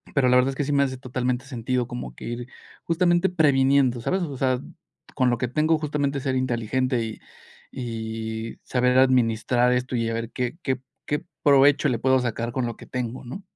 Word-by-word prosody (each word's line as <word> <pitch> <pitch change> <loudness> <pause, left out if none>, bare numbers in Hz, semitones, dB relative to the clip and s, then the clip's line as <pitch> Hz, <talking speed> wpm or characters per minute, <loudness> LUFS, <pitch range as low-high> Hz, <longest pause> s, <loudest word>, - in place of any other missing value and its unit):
Pero 135 -3 +4
la 125 - +5
verdad 125 +1 +4
es 135 - -7
que 145 - 0
sí 145 - -2
me 140 0 +4
hace 130 -2 -1
totalmente 125 0 -2
sentido 125 -1 -2
como 95 - -6
que - - -11
ir 120 +1 -5 0.4
justamente 175 +2 +2
previniendo, 135 -6 +3
¿sabes? 185 +10 -1
O 145 -5 -4
sea, 130 -1 +1 0.5
con 125 -1 +2
lo 120 - 0
que 125 0 -1
tengo 155 +5 +2
justamente 145 -2 -1
ser 130 -1 -1
inteligente, 125 0 0
y 110 -1 -7 0.5
y 110 -2 -5
saber 125 0 +2
administrar 125 -1 +3
esto, 125 0 -1
y 115 -1 0
a - - -2
ver 115 0 -3
que 125 +6 -3
que 130 -1 -1 0.3
que 150 +3 -2 0.2
provecho 145 +1 +5
le 120 -4 0
puedo 130 +1 +3
sacar 120 -1 -2
con 125 -1 -1
lo 120 - -5
que - - -13
tengo, 125 0 -4
¿no? 130 +12 -7
130 Hz, 200 wpm, -24 LUFS, 120-140 Hz, 0.5 s, la